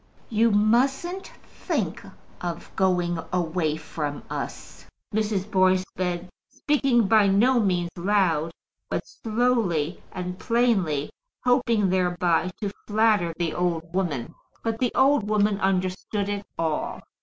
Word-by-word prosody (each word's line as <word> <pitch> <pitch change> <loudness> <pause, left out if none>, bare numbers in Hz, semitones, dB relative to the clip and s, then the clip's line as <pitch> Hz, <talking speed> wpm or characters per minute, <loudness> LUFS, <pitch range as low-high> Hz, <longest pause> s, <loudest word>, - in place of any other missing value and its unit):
"You 230 +1 +3
mustn't 265 - +2 0.2
think - - -3 0.4
of 175 -1 -5
going 180 -3 +1
away 165 -3 0
from 150 -2 -5
us," - - -6 0.3
Mrs. 210 -2 -1
Boyce 185 -1 +3
said, 180 -1 -2 0.2
speaking 270 -4 +2
by 215 -1 +5
no 235 +6 +4
means 180 -5 +1
loud, 175 -4 +1 0.4
but - - -2
slowly 215 -9 0
and 180 0 -5
plainly, 200 - +1 0.3
hoping 235 -6 +3
thereby 180 -1 +1
to 205 -2 -1 0.2
flatter 210 -5 +3
the 170 -2 -1
old 170 -1 -2
woman. 160 -11 -2 0.3
But 225 -1 -2
the 250 -2 +1
old 265 -6 +3
woman 210 -1 +2
understood 190 +2 -1
it 200 0 -4
all. 160 -2 -2
190 Hz, 120 wpm, -25 LUFS, 175-225 Hz, 0.4 s, by